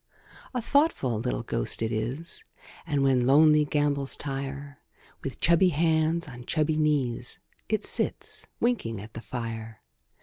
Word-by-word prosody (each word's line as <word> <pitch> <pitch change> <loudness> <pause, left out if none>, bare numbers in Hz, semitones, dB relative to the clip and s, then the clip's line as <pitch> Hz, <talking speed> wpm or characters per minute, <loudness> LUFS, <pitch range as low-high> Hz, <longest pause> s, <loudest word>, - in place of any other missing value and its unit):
A 245 - -1
thoughtful 280 - +2
little 120 0 -2
ghost 115 - -1
if 110 - -1
is; 120 +9 -3 0.4
And, 145 -3 +1
when 130 -2 +3
lonely 150 +2 +6
gambols 145 -2 +1
tire, 140 0 -5 0.4
With - - -5
chubby 170 +2 +4
hands 160 +1 +1
on 125 -3 -10
chubby 155 0 +1
knees, 140 -6 0 0.3
It 215 0 0
sits - - -1
winking 165 - 0
at 110 +3 -10
the 115 - -7
fire. 115 -2 -6
140 Hz, 135 wpm, -27 LUFS, 120-160 Hz, 0.4 s, lonely